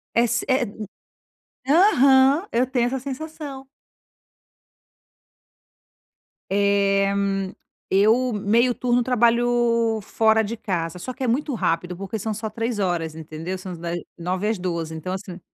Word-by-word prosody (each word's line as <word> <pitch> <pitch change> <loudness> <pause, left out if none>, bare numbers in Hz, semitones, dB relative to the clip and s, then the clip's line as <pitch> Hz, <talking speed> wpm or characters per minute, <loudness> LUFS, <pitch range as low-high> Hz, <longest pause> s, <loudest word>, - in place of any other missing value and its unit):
é 235 - +5
si 240 +2 -1
eh, 260 -1 +2
hum, 215 0 -8 0.9
aham, 280 -2 +5
eu 245 +2 +2
tenho 250 -2 +1
essa 265 +2 -2
sensação. 275 0 -7 2.8
Eh, 200 0 +2 0.8
eu 225 +6 +3
meio 225 +4 +2
turno 245 0 +1
trabalho 235 -2 +2
fora 220 +2 +2
de 225 +2 -4
casa, 175 -3 -3
só 255 - -5
que 265 - -6
é - - 0
muito 275 +4 0
rápido 175 -3 -1
porque 195 +4 -5
são 220 +2 -2
só 220 +1 -4
3 230 0 -3
horas, 170 -4 -1
entendeu? 160 +3 -6
São 185 0 -8
uns - - -8
da 170 +1 -5 0.3
9h 185 +4 -2
às 220 - 0
12h, 170 -3 -3
então 185 +4 -4
assim 185 -1 -7
220 Hz, 140 wpm, -23 LUFS, 185-250 Hz, 2.8 s, é